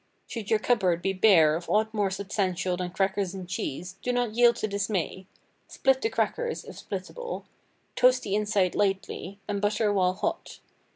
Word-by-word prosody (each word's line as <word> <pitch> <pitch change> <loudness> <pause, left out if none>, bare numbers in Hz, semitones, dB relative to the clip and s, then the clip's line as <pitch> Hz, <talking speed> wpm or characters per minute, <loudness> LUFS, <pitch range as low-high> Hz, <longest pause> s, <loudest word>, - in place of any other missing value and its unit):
Should 220 -4 -6
your 220 - +4
cupboard 190 -7 +1
be 195 - +1
bare 180 -6 +5
of 170 +1 -6
aught 220 +1 +2
more 205 -3 +1
substantial 190 -2 -1
than 180 0 -3
crackers 195 +1 -1
and 185 -2 -7
cheese, 180 +1 -4
do 250 - -1
not 245 -3 0
yield 240 +1 +5
to 215 - -2
dismay; 200 -2 -2 0.4
split 265 -1 +1
the 445 - +1
crackers 475 0 -1
(if - - -10
splittable), - - -6 0.5
toast 255 0 +4
the 195 - -3
inside 205 -3 +1
lightly, 195 -1 -1
and 205 -1 -2
butter 210 0 +1
while 185 -2 +2
hot. 335 - -3
200 Hz, 170 wpm, -27 LUFS, 185-220 Hz, 0.5 s, bare